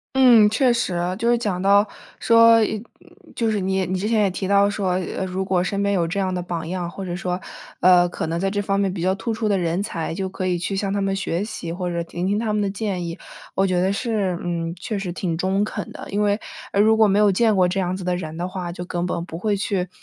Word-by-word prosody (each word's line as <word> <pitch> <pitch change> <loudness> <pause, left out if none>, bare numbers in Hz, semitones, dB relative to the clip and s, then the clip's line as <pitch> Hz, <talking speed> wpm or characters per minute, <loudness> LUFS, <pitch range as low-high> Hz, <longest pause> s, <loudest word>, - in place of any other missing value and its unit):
嗯， 240 -5 +7
确 245 +3 +3
实， 185 -7 -1 0.2
就 230 +2 0
是 240 - +3
讲 205 -6 -2
到 200 +2 +4 0.3
说， 230 0 +6 0.8
就 230 -1 0
是 210 -2 0
你 190 0 0
你 185 +2 -2
之 205 +4 -2
前 220 -2 +3
也 200 - +3
提 190 +1 -4
到 200 +1 +4
说， 200 -2 -2 0.3
呃， 190 - -2
如 190 +1 -3
果 185 -2 +1
身 200 +2 -2
边 200 0 +1
有 175 -3 +1
这 185 +5 -2
样 190 -1 0
的 180 - -2
榜 170 -2 -4
样， 175 -1 -3
或 195 +1 -7
者 175 -1 -4
说， 180 0 -3 0.4
呃， 175 -1 +5
可 170 - -4
能 165 +1 -2
在 195 +2 0
这 205 0 -1
方 195 -1 0
面 195 -2 0
比 180 - -5
较 185 +2 +1
突 230 +3 -3
出 220 0 -2
的 200 -2 +2
人 175 +1 0
才 170 -6 -3
就 190 +2 -3
可 185 0 -5
以 180 -1 +1
去 180 +3 -3
向 195 0 -1
他 200 - 0
们 195 -1 0
学 195 0 -2
习， 170 -6 -6
或 180 +1 -3
者 170 -1 -2
听 175 +2 -4
听 200 +1 +1
他 220 0 -1
们 210 0 +1
的 200 - 0
建 195 -3 -3
议。 170 0 -5 0.4
我 195 - +3
觉 185 -2 +1
得 190 +2 +1
是， 200 -5 -1
嗯， 170 -1 -3
确 200 +3 -4
实 185 -3 -4
挺 170 -2 -2
中 190 +3 +1
肯 215 - -4
的， - - -8
因 205 +1 0
为， 205 0 +2 0.4
呃， 200 - +4
如 220 +1 +4
果 220 -1 +6
没 200 0 +2
有 210 -1 +5
见 220 +2 +3
过 185 -1 +4
这 190 +2 -1
样 180 -1 -1
子 190 - -6
的 180 0 0
人 160 -3 -6
的 175 +2 -3
话， 185 -2 -5
就 175 - -6
根 175 0 -3
本 175 -1 -2
不 165 -1 -7
会 210 +2 0
去， 190 -2 -1
190 Hz, 290 characters per minute, -22 LUFS, 180-205 Hz, 0.8 s, 嗯